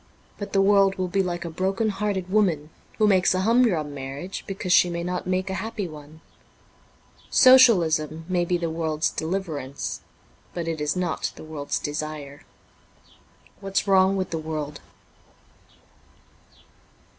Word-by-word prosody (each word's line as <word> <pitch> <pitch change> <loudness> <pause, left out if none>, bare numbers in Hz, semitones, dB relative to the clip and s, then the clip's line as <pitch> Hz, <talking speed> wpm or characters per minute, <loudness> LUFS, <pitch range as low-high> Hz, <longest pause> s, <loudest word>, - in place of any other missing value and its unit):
But 205 -1 -6
the 195 -1 +3
world 195 -1 +4
will 185 -1 -2
be 195 +2 +1
like 175 -2 -3
a - - -4
broken 190 +6 -1
hearted 195 -2 -2
woman 180 -7 +1 0.3
who 215 - +3
makes 190 -2 +3
a 185 - 0
humdrum 200 -9 +2
marriage 140 +7 -6
because 190 -2 -1
she 180 - +5
may 170 0 -3
not 180 +1 -3
make 185 +1 0
a 190 -1 -3
happy 225 -3 -4
one; 155 0 -12 1.1
Socialism 170 - +5
may 180 -1 +1
be 175 +1 0
the 170 -1 -3
world's 160 -1 -1
deliverance, 160 -6 -4 0.5
but 170 -2 -3
it 160 -2 -3
is 150 -1 0
not 180 -3 -2
the - - -11
world's 155 -2 -4
desire. 150 -1 -5 0.6
' - - -29
Whafs 195 0 -1
Wrong 190 0 +4
with 185 -1 -3
the 165 - -2
World.' 155 -2 -5
180 Hz, 145 wpm, -24 LUFS, 155-195 Hz, 1.1 s, she